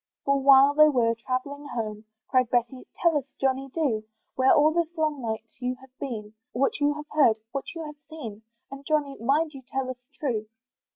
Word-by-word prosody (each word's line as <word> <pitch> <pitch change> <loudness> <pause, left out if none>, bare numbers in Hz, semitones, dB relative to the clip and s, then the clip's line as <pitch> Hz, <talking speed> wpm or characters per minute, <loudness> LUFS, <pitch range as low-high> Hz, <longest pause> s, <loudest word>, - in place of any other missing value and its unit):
For 275 0 +3
while 275 +1 +7
they 305 +1 +7
all - - +4
were 230 -2 +3
travelling 260 +5 -4
home, 220 -4 -4 0.3
Cried 255 -2 +3
Betty, 245 +1 -1 0.2
"Tell 340 -2 +4
us 270 - -11
Johnny, 270 0 0
do, 260 -9 0 0.3
"Where 260 0 +4
all 300 +1 +5
this 340 0 -1
long 305 -3 0
night 220 -2 -3 0.2
you 250 0 -2
have 265 -1 -18
been, 215 -6 -5 0.2
"What 270 +3 +1
you 290 0 +2
have 300 0 -7
heard, 275 -8 +4
what 275 0 -3
you 330 - -5
have 300 0 -9
seen, 230 -10 -8 0.3
"And 275 0 -8
Johnny, 290 -2 0
mind 295 +7 +1
you 270 - -9
tell 260 0 -3
us 250 0 -12 0.2
true." 225 -7 -1
270 Hz, 195 wpm, -26 LUFS, 245-295 Hz, 0.3 s, while